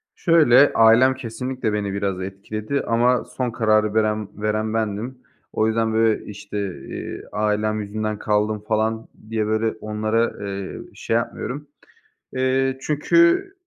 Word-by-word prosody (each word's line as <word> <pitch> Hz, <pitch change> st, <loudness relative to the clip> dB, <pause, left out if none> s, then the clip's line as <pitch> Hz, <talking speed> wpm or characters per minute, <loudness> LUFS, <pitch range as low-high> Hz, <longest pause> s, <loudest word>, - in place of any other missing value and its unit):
Şöyle, 145 Hz, -5 st, +5 dB
ailem 115 Hz, +4 st, +6 dB
kesinlikle 125 Hz, -2 st, -4 dB
beni 100 Hz, -2 st, -2 dB
biraz 100 Hz, -2 st, -2 dB
etkiledi. 110 Hz, +7 st, -4 dB
Ama 120 Hz, +2 st, +2 dB
son 125 Hz, -2 st, -3 dB
kararı 110 Hz, -2 st, +2 dB
veren 110 Hz, -1 st, +1 dB
veren 110 Hz, +1 st, -1 dB
bendim. 110 Hz, +3 st, -2 dB, 0.4 s
O 110 Hz, -, +2 dB
yüzden 110 Hz, 0 st, 0 dB
böyle, 110 Hz, -1 st, +2 dB
işte, 105 Hz, 0 st, -8 dB, 0.3 s
eee, -, -, -6 dB
ailem 105 Hz, 0 st, 0 dB
yüzünden 110 Hz, +1 st, -3 dB
kaldım 105 Hz, 0 st, 0 dB
falan 110 Hz, +1 st, 0 dB, 0.2 s
diye 110 Hz, -1 st, 0 dB
böyle 110 Hz, +1 st, 0 dB
onlara, 110 Hz, 0 st, -1 dB
eee, 100 Hz, -1 st, -5 dB
şey 115 Hz, -, -2 dB
yapmıyorum. 125 Hz, +4 st, -3 dB, 0.7 s
Eee, 130 Hz, 0 st, +1 dB
çünkü, 150 Hz, -, -1 dB
ııı, 355 Hz, +3 st, +4 dB
110 Hz, 130 wpm, -22 LUFS, 105-125 Hz, 0.7 s, ailem